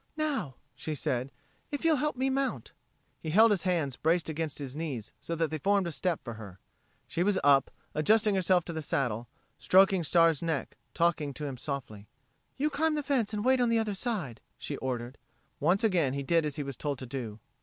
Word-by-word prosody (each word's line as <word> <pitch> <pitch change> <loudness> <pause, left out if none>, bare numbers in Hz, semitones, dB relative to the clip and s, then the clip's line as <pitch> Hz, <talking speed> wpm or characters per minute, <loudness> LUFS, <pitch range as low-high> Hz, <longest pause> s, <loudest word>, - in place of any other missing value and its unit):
"Now," 285 - -1 0.2
she 155 - -5
said, 130 -1 -2 0.4
"if 290 +2 -4
you'll 320 -2 +5
help 300 +2 0
me 265 +1 0
mount." 270 0 -1 0.5
He 160 - -5
held 220 +7 +6
his 195 -4 +2
hands 160 -8 0
braced 165 +1 +1
against 160 -1 -3
his 140 -2 -6
knees 140 -9 -4
so 165 - -4
that 165 -1 0
they 155 - -2
formed 200 +4 +2
a 170 - -2
step 175 +1 -1
for 120 - -6
her. 105 -4 -10 0.5
She 170 - -2
was 195 +1 +2
up, 140 -1 +5 0.2
adjusting 210 +7 +3
herself 185 -2 +3
to 170 - -5
the 160 - -3
saddle, 120 -5 -1 0.3
stroking 190 -1 +5
Star's 165 -1 +4
neck, 160 -4 -2 0.2
talking 160 -5 +1
to 150 - -5
him 140 -2 -4
softly. 120 -7 -6 0.5
"You 300 +3 +1
climb 315 +2 +1
the 295 - -1
fence 255 -7 +1
and 210 +1 -3
wait 260 0 +4
on 240 - +3
the 230 - +3
other 220 -2 0
side," 195 - -3 0.2
she - - -5
ordered. 125 0 -4 0.4
Once 175 +8 +2
again 175 -11 +2
he 140 0 -3
did 165 +2 +2
as 145 - -4
he 150 - -3
was 140 -1 -5
told 145 -2 -2
to 130 - -7
do. 120 -4 -6
165 Hz, 210 wpm, -30 LUFS, 140-205 Hz, 0.5 s, held